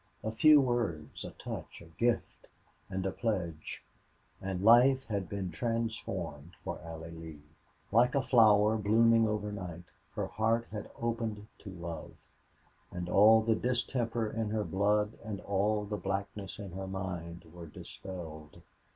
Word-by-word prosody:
A 110 - -1
few 150 +7 +7
words, 120 - -1
a - - -5
touch, - - -7
a - - -13
gift, 120 0 0 0.4
and 95 0 -3
a 95 - 0
pledge 90 -9 -3 0.6
and 95 -1 -3
life 125 +4 +6
had 100 -5 -3
been 95 -3 -3
transformed 95 - -3
for 85 -2 -4
Allie 80 -1 -8
Lee. 80 -3 -10 0.5
Like 120 +5 +4
a 140 - +4
flower 110 -3 +5
blooming 115 +2 +4
overnight, 105 -5 -4 0.3
her - - -1
heart 115 +2 +1
had 105 -1 -6
opened 115 -3 -2
to 100 - -9
love, 85 -3 -7 0.7
and 90 0 -5
all 110 +3 +7
the 115 0 +3
distemper 120 -1 0
in 110 0 -2
her 105 0 0
blood 105 +4 +1
and 105 -3 -5
all 105 +2 +1
the 105 0 -3
blackness 100 0 -4
in 100 -3 -7
her 95 +2 -5
mind 90 -2 -5
were 85 -1 -9
dispelled. 80 -2 -9
105 Hz, 140 wpm, -32 LUFS, 90-115 Hz, 0.7 s, few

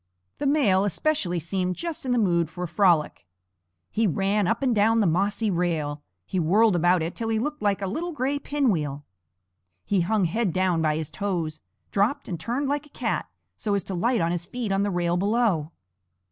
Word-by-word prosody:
The 290 - 0
male 230 -10 +3
especially 205 - 0
seemed 180 +2 -2
just 330 - -5
in - - 0
the 245 - +2
mood 170 -7 +2
for 180 +1 -6
a - - -2
frolic. 170 - +2 0.6
He 225 0 +2
ran 195 +3 +1
up 225 +6 0
and 255 -3 +2
down 225 +2 +3
the 215 - +3
mossy 200 +5 +1
rail; 160 -5 -1 0.2
he 185 - -2
whirled 200 +5 +4
about 175 0 +3
it 165 - -4
till 225 -1 -3
he 225 - +1
looked 295 +6 -3
like 200 -1 +1
a - - +1
little 320 - -3
gray 285 -1 -1
pinwheel; 165 - -1 0.8
he 195 -3 +2
hung 200 +2 +1
head 195 +1 0
down 185 -3 +1
by 155 -1 +2
his 155 -1 -4
toes, 170 -6 -3 0.3
dropped, 230 +9 +1
and 175 -4 -4
turned 250 - -2
like 290 +1 -2
a - - -20
cat, - - -1 0.3
so 205 -2 -1
as 200 - -1
to 195 - -6
light 230 +6 +1
on 165 0 +1
his 175 -1 -2
feet 230 +1 -4
on 195 0 +2
the 205 - +1
rail 175 -2 0
below. 200 -6 +1
195 Hz, 200 wpm, -25 LUFS, 175-230 Hz, 0.8 s, whirled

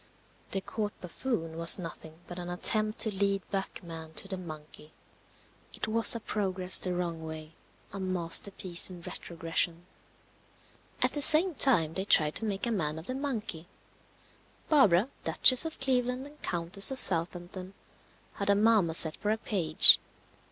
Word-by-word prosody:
The 195 - -3
Court 210 +1 -6
buffoon 170 -3 -6
was 165 0 +8
nothing 165 -2 -11
but 175 0 -10
an 175 0 -8
attempt 215 +4 -1
to 220 - -2
lead 195 0 -2
back 195 -1 -5
man 160 -2 -10
to 195 - -2
the 195 - -5
monkey. 155 -3 -12 0.8
It - - -5
was 230 +2 +3
a - - -4
progress 190 -4 0
the 180 -1 -3
wrong 170 -2 -5
way. 160 0 -10 0.4
A 200 - -7
masterpiece 185 0 -1
in 180 -2 -12
retrogression. 165 +1 -4 1.2
At - - +1
the 290 - 0
same 325 +5 +6
time 175 - +1
they 190 +3 -3
tried 155 -6 +2
to 225 - -6
make 200 0 -4
a 235 - -3
man 155 -7 -3
of 160 - -10
the 255 - -5
monkey. 225 - -6 1.0
Barbara, 230 - +3
Duchess 255 +4 +5
of 320 - -7
Cleveland 255 -1 -1
and 295 +1 -16
Countess 175 +3 +1
of 265 - -5
Southampton, 180 +1 -2 0.6
had 200 -1 -4
a 200 - +4
marmoset 195 -7 +4
for 205 - -4
a 215 - 0
page. 175 -8 +6
185 Hz, 155 wpm, -28 LUFS, 165-220 Hz, 1.2 s, was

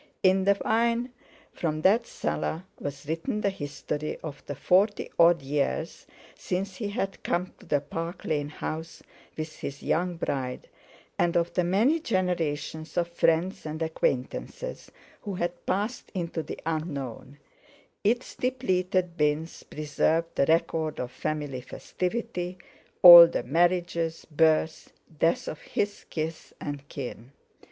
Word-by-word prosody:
In 190 0 +4
the 200 0 +4
wine 235 +2 +2 0.4
from 155 -2 -2
that 225 +5 +4
cellar 165 +3 -2 0.2
was 140 0 -6
written 190 - -2
the 200 - +1
history 150 -2 -4
of 145 -2 -7
the 145 - -4
forty 195 +8 +2
odd 170 -3 +6
years 140 +1 -2 0.3
since 185 +1 -3
he 215 - -3
had 195 -2 -3
come 180 +1 -1
to - - -16
the 145 -1 +2
Park 165 +4 -5
Lane 145 -2 -1
house 160 +2 -6 0.3
with 155 0 -5
his 140 0 -6
young 175 +2 0
bride, 130 -6 -3 0.5
and 175 0 +3
of 170 0 0
the 180 - +2
many 220 - +3
generations 170 - -2
of 170 -1 +1
friends 170 +2 +1
and 155 0 -5
acquaintances 160 - -2 0.3
who 200 -3 -4
had 175 0 -3
passed 205 +6 -2
into 170 -2 -2
the - - -7
unknown; 145 -5 -4 0.7
its 235 +4 +1
depleted 185 -8 0
bins 150 +2 0
preserved 155 +2 0
the 140 - +2
record 160 -1 +1
of 125 -1 -3
family 145 -4 -3
festivity—all 180 - +5
the 165 - -2
marriages, 170 +2 +1
births, 160 +1 +2 0.3
deaths 165 - +2
of 155 - -5
his 205 0 -2
kith 160 0 -4
and 145 -1 -6
kin. 125 -1 -7
170 Hz, 130 wpm, -27 LUFS, 150-185 Hz, 0.7 s, odd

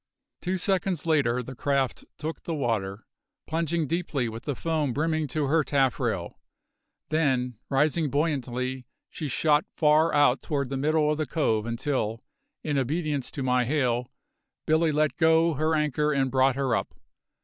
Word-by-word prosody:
Two 185 +1 -1
seconds 185 -3 0
later 135 -7 +2
the 130 - -8
craft 135 0 -1
took 155 +2 -5
the 165 - -4
water, 110 -7 -2 0.4
plunging 165 0 -1
deeply 155 -5 -1
with 115 0 -7
the 145 - -2
foam 155 -3 -1
brimming 155 +2 0
to 145 +2 -1
her 155 +3 +2
taffrail; 135 -3 0 0.7
then, 130 -7 0
rising 150 +3 +2
buoyantly, 130 -4 -2 0.2
she 155 - -5
shot 150 +3 +2
far 155 +1 +4
out 145 -3 +4
toward 140 -5 -2
the 135 - -3
middle 150 +2 +2
of 150 - -2
the 155 - -1
cove 110 -9 0
until, 115 -2 -2 0.4
in 145 -3 0
obedience 145 0 -1
to 135 - -5
my 125 -1 +2
hail, 125 -2 0 0.6
Billy 160 0 +3
let 150 0 +1
go 160 0 +4
her 155 +2 +1
anchor 150 0 +1
and 135 -2 +1
brought 130 0 +3
her 135 -4 +1
up. 100 - -3
145 Hz, 155 wpm, -26 LUFS, 130-155 Hz, 0.7 s, far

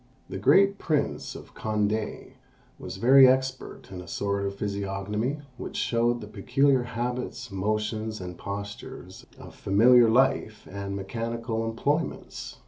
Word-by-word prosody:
The - - -5
great 200 0 +4
Prince 155 -3 -1
of - - -11
Condé 105 0 -2 0.5
was - - -7
very 130 +2 +8
expert 130 -5 -1
in 90 -1 -6
a 90 - -12
sort 100 +1 -1
of 100 - -5
physiognomy 100 +6 -3 0.2
which - - -7
showed 120 0 +1
the 105 - -8
peculiar 130 +6 +2
habits, 125 0 -4
motions, 110 +2 -2
and 90 -1 -7
postures 100 +2 -8
of - - -12
familiar 115 +4 +5
life 120 -3 +1
and 100 0 -5
mechanical 115 +3 -3
employments. 145 +8 -3
110 Hz, 130 wpm, -27 LUFS, 100-125 Hz, 0.5 s, very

